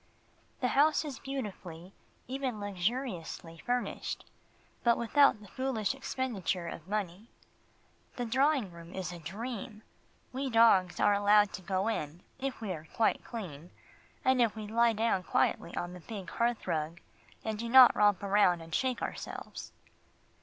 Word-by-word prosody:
The 250 - +2
house 300 +4 +3
is 285 -4 -6
beautifully, 195 -9 -6 0.3
even 260 -3 -3
luxuriously, 190 -4 -3
furnished, 245 0 -2 0.6
but 235 -1 +4
without 280 +5 +4
a - - -12
foolish 260 -2 -1
expenditure 220 -10 -2
of 165 0 -8
money. 205 +1 -3 0.9
The 245 - -2
drawing 265 -3 +2
room 170 0 -11
is 185 -1 -4
a 175 - -8
dream. 215 - -6 0.5
We 270 +1 -2
dogs 225 -6 +5
are 205 - +4
allowed 205 0 +4
to - - -6
go 190 +2 -1
in, 165 -6 -3 0.2
if 270 -3 -4
we 210 -4 -3
are 160 -2 -6
quite 225 - +2
clean, 175 - -7 0.6
and 260 -1 +4
if 230 -2 +2
we 215 -1 -6
lie 230 +2 +3
down 220 -3 +1
quietly 170 -1 0
on 175 0 -3
the 180 - -9
big 195 -1 -8
hearth 235 -1 0
rug, 165 -1 -2 0.5
and 220 -1 -2
do 235 +1 -3
not 255 0 +9
romp 205 -2 +3
about 200 -3 +4
and 165 -1 -11
shake 255 +3 0
ourselves. - - -6
210 Hz, 150 wpm, -31 LUFS, 180-245 Hz, 0.9 s, not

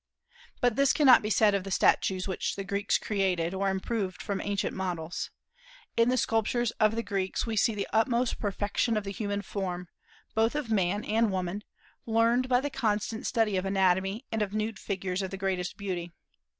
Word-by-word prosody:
But 245 -2 +2
this 275 -1 +4
cannot 275 -5 +7
be 210 - -3
said 210 0 +4
of 200 -2 0
the 195 - -6
statues 185 0 +2
which 190 - -2
the 195 - -4
Greeks 200 +1 0
created, 185 -4 0
or 195 +1 0
improved 190 0 -2
from 200 -1 -3
ancient 205 -1 -2
models. 175 -3 -3 0.7
In 230 +1 +4
the 255 - +2
sculptures 230 +1 +1
of 215 0 +4
the 230 - -1
Greeks 195 -3 -2
we 225 -2 -2
see 220 +1 +2
the 200 - -2
utmost 235 +2 +1
perfection 205 +2 0
of 210 - -1
the 195 - -5
human 205 0 -3
form, 180 -3 -4 0.4
both 225 +4 +2
of 290 -7 -3
man 200 0 +1
and 225 +1 +2
woman, 185 +2 -3 0.4
learned 230 +3 +2
by 250 0 +4
the 290 +1 -3
constant 220 -1 -1
study 220 -4 +1
of 185 - -1
anatomy 195 +4 +1
and 220 -1 -1
of 205 0 -2
nude 215 -1 -2
figures 190 -1 -3
of 190 - -3
the 195 - -6
greatest 190 -2 -2
beauty. 180 -4 -4
205 Hz, 190 wpm, -29 LUFS, 190-225 Hz, 0.7 s, cannot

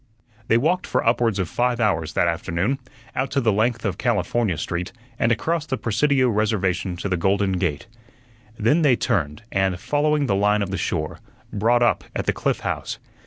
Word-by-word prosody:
They 115 - +4
walked 170 +9 +1
for - - 0
upwards 115 -3 +2
of 95 -4 -1
five 120 +5 0
hours 85 -9 0
that 85 - +2
afternoon, 85 +9 -1 0.4
out 130 +1 0
the 130 -5 +2
length 115 +3 0
of 95 -3 -2
California 110 -4 0
Street, 85 +4 -3 0.3
and 115 - +2
across 155 +8 0
the 130 - -1
Presidio 130 +4 +2
Reservation 100 -5 0
to 95 - -3
the 95 - 0
Golden 95 +3 +1
Gate. 80 -3 -1 0.7
Then 115 +10 +3
they 140 -5 +5
turned, 85 - -1
and, 95 -2 +1
following 150 +3 +1
the 105 - +1
line 105 +1 +2
of 95 - -5
the - - -1
shore, 75 -3 -2 0.3
brought 120 +4 +3
up 120 - +2
at - - -2
the - - +1
Cliff - - -1
House. - - -3
105 Hz, 180 wpm, -23 LUFS, 95-125 Hz, 0.7 s, they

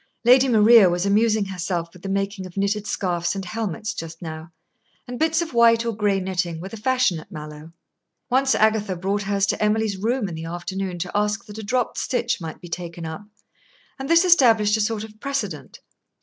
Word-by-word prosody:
Lady 255 +2 +6
Maria 220 -3 +6
was 175 +2 -1
amusing 215 +1 +2
herself 175 -3 -4
with 180 - -15
the 195 - -6
making 195 -1 -2
of 180 - -15
knitted 200 +1 -1
scarfs 175 -1 -1
and 195 -1 -5
helmets 215 0 -4
just 165 0 -7
now, 160 0 -8 0.6
and 245 0 -6
bits 320 +1 +2
of 320 - -9
white 230 -1 +4
or 230 -2 -2
gray 205 -2 +1
knitting 180 -3 -2
were 185 +3 -7
the 225 - -8
fashion 250 -5 +1
at 170 - -15
Mallowe. 150 -1 -9 0.6
Once 265 +2 +2
Agatha 215 -3 +2
brought 195 +3 -2
hers 200 0 0
to 200 - -2
Emily's 210 -1 +1
room 230 +2 -1
in 175 - -6
the 160 0 -6
afternoon 180 +2 -4
to 180 +1 -4
ask 210 +2 0
that 210 0 -9
a - - -6
dropped 245 +2 -1
stitch 240 -5 -1
might 160 -1 -7
be 175 - -11
taken 170 -1 -6
up, 160 +6 -7 0.7
and 270 - -5
this 335 +2 +5
established 225 - +5
a 220 - 0
sort 210 0 -1
of 215 -1 -12
precedent. 205 - -4
205 Hz, 200 wpm, -23 LUFS, 180-225 Hz, 0.7 s, Lady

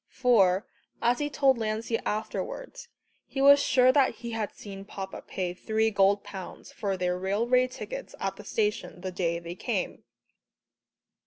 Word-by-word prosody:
For, 205 -7 +3 0.3
as 240 +1 +2
he 295 0 -1
told 270 -3 +3
Lancey 220 +1 -1
afterwards, 215 - -4 0.4
he 270 - -5
was 280 +1 +8
sure 255 -2 +5 0.2
he 235 -1 -7
had 220 -2 -2
seen 195 -2 -9
Papa 195 -1 -7
pay 180 -2 -3
three 220 +4 0
gold 200 0 +3
pounds 190 -2 -9
for 195 -2 -2
their 180 0 -1
railway 235 +7 +2
tickets - - -7
at 195 0 -2
the 210 - -11
station 210 -3 -2
the 185 0 -4
day 170 -2 -1
they 170 0 -6
came. - - -3
210 Hz, 150 wpm, -28 LUFS, 190-245 Hz, 0.4 s, was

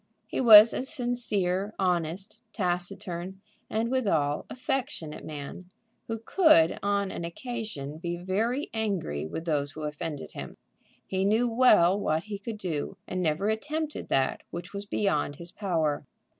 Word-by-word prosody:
He - - -2
was 220 -2 +10
a - - -2
sincere, 215 - -1
honest, 180 +2 -1
taciturn, 180 0 -2 0.3
and 225 +2 -1
withal, 160 - +1
affectionate 255 - -3
man, 155 +4 -7 0.4
who 225 - -2
could 225 - +4
on 200 -1 0
an - - -5
occasion 170 - -5
be 175 0 -3
very 220 - -1
angry 190 - -2
with 165 - -5
those 145 -3 0
who 155 - -7
offended 150 0 -5
him. - - -8 0.5
He 190 0 -1
knew 220 +5 +3
well 215 -6 +5
what 160 -4 0
he 205 -1 -6
could 215 +1 -6
do, 180 -1 -3
and 185 - -2
never 170 +4 +1
attempted 300 +8 -3
that 135 -1 +1
which 175 +2 -7
was 200 0 -6
beyond 150 -9 0
his 170 +3 -10
power. 160 -8 -1
190 Hz, 145 wpm, -28 LUFS, 165-220 Hz, 0.5 s, was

